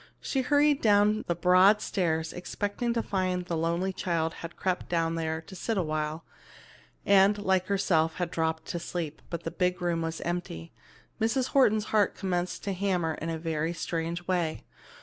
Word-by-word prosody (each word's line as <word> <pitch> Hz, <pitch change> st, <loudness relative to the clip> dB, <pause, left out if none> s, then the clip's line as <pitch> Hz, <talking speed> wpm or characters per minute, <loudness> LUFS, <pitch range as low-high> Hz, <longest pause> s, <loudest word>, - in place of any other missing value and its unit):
She 270 Hz, -, -1 dB
hurried 290 Hz, +2 st, +3 dB
down 210 Hz, 0 st, +3 dB
the 170 Hz, -, 0 dB
broad 185 Hz, +4 st, +5 dB
stairs, 160 Hz, -6 st, -1 dB
expecting 205 Hz, +6 st, -3 dB
to 230 Hz, -, 0 dB
find 185 Hz, -2 st, -1 dB
that 180 Hz, -, -12 dB
the 170 Hz, -, -1 dB
lonely 170 Hz, +4 st, 0 dB
child 165 Hz, -3 st, -1 dB
had 165 Hz, 0 st, -7 dB
crept 185 Hz, -1 st, -2 dB
down 165 Hz, -1 st, +1 dB
there 160 Hz, -1 st, -2 dB
to 190 Hz, +4 st, -12 dB
sit 220 Hz, +4 st, -2 dB
awhile 155 Hz, -2 st, -2 dB, 0.8 s
and, 200 Hz, +1 st, +5 dB
like 190 Hz, -2 st, +1 dB
herself, 165 Hz, -5 st, +2 dB
had 175 Hz, -1 st, -3 dB
dropped 160 Hz, -1 st, -1 dB
to 170 Hz, -, -2 dB
sleep, 165 Hz, -3 st, -5 dB
but 170 Hz, -, -5 dB
the 165 Hz, -, -3 dB
big 180 Hz, -1 st, 0 dB
room 175 Hz, -2 st, 0 dB
was 165 Hz, 0 st, -3 dB
empty. 170 Hz, -, -4 dB, 0.5 s
Mrs. 245 Hz, +4 st, +1 dB
Horton's 220 Hz, -6 st, +3 dB
heart 210 Hz, -2 st, +3 dB
commenced 180 Hz, -2 st, -2 dB
to 200 Hz, -, -2 dB
hammer 180 Hz, -4 st, 0 dB
in 165 Hz, -, -3 dB
a 165 Hz, -, -2 dB
very 160 Hz, 0 st, -2 dB
strange 170 Hz, +1 st, -3 dB
way. 175 Hz, -4 st, -1 dB
175 Hz, 175 wpm, -28 LUFS, 165-200 Hz, 0.8 s, broad